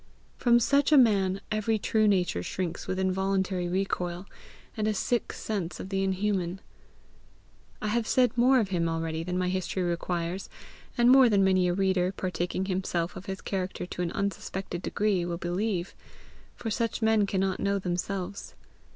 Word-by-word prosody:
From 240 -1 +4
such 280 +5 +2
a 300 - +7
man 195 -6 +4
every 215 +1 +1
true 215 +1 +2
nature 180 - +1
shrinks 175 - -4
with 185 0 -2
involuntary 190 -1 0
recoil, 180 -1 -2 0.5
and 215 -1 -1
a 215 - +1
sick 240 +4 0
sense 195 -6 -4
of 190 - -6
the 195 -1 0
inhuman. 190 -2 -1 1.2
But - - -5
I - - 0
have 230 +1 0
said 250 -3 +3
more 255 +2 +5
of 210 -5 0
him 170 -3 0
already 165 0 -2
than 180 +2 -3
my 180 0 0
history 185 0 -2
requires, 175 +1 -2 0.5
and 240 +1 +6
more 260 -2 +7
than 200 -2 +4
many 185 -1 +3
a 175 - +1
reader, 190 -1 +1
partaking 180 0 -2
himself 180 -3 -2
of 190 0 -9
his 190 -1 -5
character 185 -2 -3
to 180 - -6
an 170 -1 -1
unsuspected 190 -2 -3
degree, 200 -2 0
will 170 0 -3
believe; 180 +1 -2 0.6
for 225 - -4
such 230 +1 -1
men 220 -2 +3
cannot 190 -1 0
know 200 0 +1
themselves. 185 +1 -4
190 Hz, 170 wpm, -28 LUFS, 180-210 Hz, 1.2 s, a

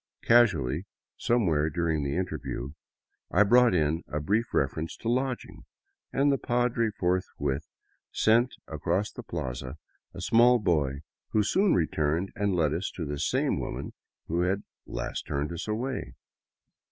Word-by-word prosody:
Casu 120 -4 +6
ally, 65 +6 -2 0.3
somewhere 85 -11 +2
during 80 -1 0
the 70 0 -2
interview, 80 -7 -3 0.6
I 105 - +5
brought 120 0 +5
in 80 0 +1
a 75 - -3
brief 105 +10 0
refer - - 0
ence 80 - -5
to - - -7
lodging, 130 +1 -2 0.5
and 140 +1 +3
the 140 - +1
padre 120 -2 +1
forthwith 90 -7 -1 0.4
sent 120 +3 +3
across 95 +5 -1
the - - -8
plaza 65 - -5 0.4
a - - -7
small 120 +2 +5
boy 75 - 0 0.3
who 110 - +4
soon 190 - +3
returned 80 +2 0
and 100 -2 0
led 80 -4 +2
us 90 +4 -2
to 85 - -3
the 75 0 -4
same - - +1
woman - - -5 0.3
who 85 +2 -1
had 95 +3 0 0.2
last - - -4
turned 75 +1 -2
us 85 +4 -5
away. 125 +5 -3
90 Hz, 150 wpm, -28 LUFS, 75-115 Hz, 0.6 s, Casu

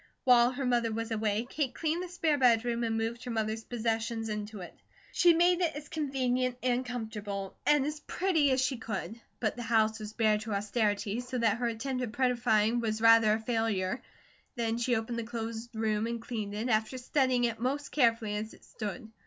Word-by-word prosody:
While 245 -1 +6
her 270 +1 -3
mother 240 -2 +1
was 230 +1 -3
away 215 0 0
Kate 270 -2 -2
cleaned 325 +2 -1
the 365 - -4
spare 330 -4 0
bedroom 235 -1 +3
and 225 -1 0
moved 230 +2 -2
her 250 - -6
mother's 220 -1 -2
possessions 225 -1 -2
into 210 -1 -5
it. 175 - -9 0.4
She 350 - +5
made 350 +1 +4
it 330 -4 +1
as 295 0 -8
convenient 255 -4 -1
and 250 0 +1
comfortable 215 -5 -5
and 295 -2 +4
as 300 +1 -3
pretty 325 -4 +1
as 260 0 +2
she 260 0 0
could, 225 +1 -5 0.2
but 215 -3 0
the 240 - -6
house 220 -1 +2
was 215 0 -7
bare 215 -2 +2
to 220 0 -5
austerity, 205 +1 0
so 250 +1 -4
that 230 -2 +2
her 240 0 -1
attempt 255 +3 -3
at 240 -3 -4
prettifying 240 -3 +2
was 220 -2 -1
rather 225 -1 +6
a 220 - 0
failure. 225 -1 -1 0.5
Then 230 -1 -1
she 245 +1 +1
opened 225 +1 -2
the - - -2
closed 230 0 -5
room 220 0 0
and 235 0 -3
cleaned 215 -3 -5
it, 220 +4 -2
after 220 +2 +1
studying 255 -1 +1
it 235 -1 0
most 275 +4 -2
carefully 230 -6 +2
as 215 +1 -5
it - - -22
stood. 220 +1 -6
230 Hz, 200 wpm, -30 LUFS, 220-255 Hz, 0.5 s, While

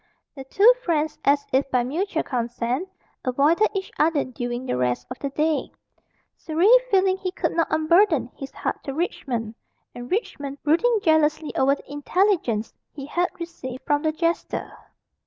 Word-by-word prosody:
The 270 -2 -9
two 410 - +6
friends, 310 -5 -1
as 285 +1 +3
if 275 +1 +2
by 250 -2 +2
mutual 325 +6 -2
consent, 245 +6 -2 0.3
avoided 290 - +3
each 385 -1 -3
other 305 -2 +3
during 245 -1 -5
the - - -1
rest 125 -1 -1
of 255 - -6
the 280 - -3
day 305 +2 -1 0.6
Surrey 330 +4 0 0.2
feeling 380 -2 +3
he 380 -1 -3
could - - -1
not 330 - +1
unburden 315 - +3
his 275 - -7
heart - - -4
to 275 - -4
Richmond, 240 -9 -3 0.4
and 245 0 -8
Richmond 285 - -3
brooding 440 +11 +3
jealously 310 -1 +2
over 275 +1 +3
the 285 - -15
intelligence 290 - 0 0.2
he 275 -2 -8
had 350 +5 0
received 300 -7 -7
from 290 0 +1
the 315 0 +1
jester. 335 +2 -2
300 Hz, 155 wpm, -24 LUFS, 260-340 Hz, 0.6 s, two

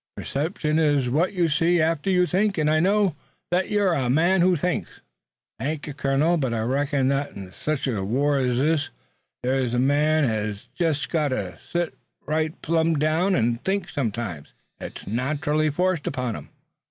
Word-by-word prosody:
"Perception 155 +1 -1
is 145 -5 +2
what 170 +9 +1
you 175 -3 +2
see 165 +3 +2
after 160 +2 +1
you 180 -1 +4
think, 195 +2 +1
and 155 -1 +2
I 155 - +3
know 195 -1 +2 0.4
that 180 +1 +1
you're 205 -4 +2
a 130 -6 0
man 170 +7 +3
who 180 +1 +4
thinks." 180 +3 -1 0.7
"Thank 150 +2 -3
you, 150 - -6
colonel, 145 +5 +1
but 130 -6 -1
I 110 - -1
reckon 135 +3 0
that 140 +1 -1
in 95 -2 -9
sech 155 +5 -2
a 110 -8 -1
war 140 +7 +1
ez 125 -2 +1
this 145 +2 +1 0.5
a 125 -1 0
man 150 +4 +3
hez 105 -4 -2
jest 160 -4 0
got 155 -3 +1
to 100 -10 -3
set 175 -1 -1 0.3
right 155 +1 -1
plum' 165 0 +2
down, 160 +6 +2
an' 115 0 +1
think 195 +9 -2
sometimes. 110 - -4 0.3
It's - - -8
naterally 150 - 0
forced 180 0 0
upon 125 -4 -2
him. - - -9
150 Hz, 170 wpm, -24 LUFS, 130-170 Hz, 0.7 s, you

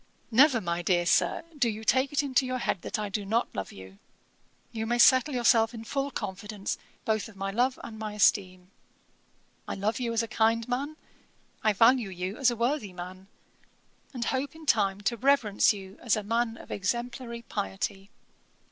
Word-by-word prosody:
'Never, 260 +1 +6
my 170 -3 -2
dear 175 -1 +2
Sir, 175 - +2
do 265 -5 +2
you 220 0 -5
take 260 +4 +2
it 290 0 +1
into 270 -1 +2
your 255 0 -2
head 235 - -1
to - - -29
think - - -4
that - - -1
I 210 -1 -3
do 205 +1 -3
not 225 +4 0
love 95 - -4
you; 95 +1 -12 0.7
you 220 -1 -4
may 240 +1 +1
settle 260 +3 +5
yourself 235 -1 +3
in 225 - -7
full 275 +4 -2
confidence 205 -3 -5 0.3
both 220 -1 0
of 215 - -16
my 195 0 -3
love 250 +5 +1
and 220 -1 -8
my 215 -1 -4
esteem; 185 -3 +2 1.0
I - - -3
love 210 +5 -1
you 240 -2 -1
as 230 0 +1
a - - -4
kind 225 0 +1
man, 275 +5 -2 0.7
I 215 - +4
value 230 +1 +4
you 185 +2 -4
as 265 -3 +4
a 240 - -2
worthy 235 -3 -1
man, 185 +2 -9 0.8
and 245 -4 -4
hope 270 +5 -2
in 320 0 -12
time 200 -6 +2
to 235 +4 -1
reverence 245 -6 +3
you 195 -1 -8
as 235 - +2
a 215 - -3
man 230 +2 0
of - - -12
exemplary 235 +3 -3
piety. 195 -2 -4
225 Hz, 190 wpm, -28 LUFS, 195-245 Hz, 1.0 s, Never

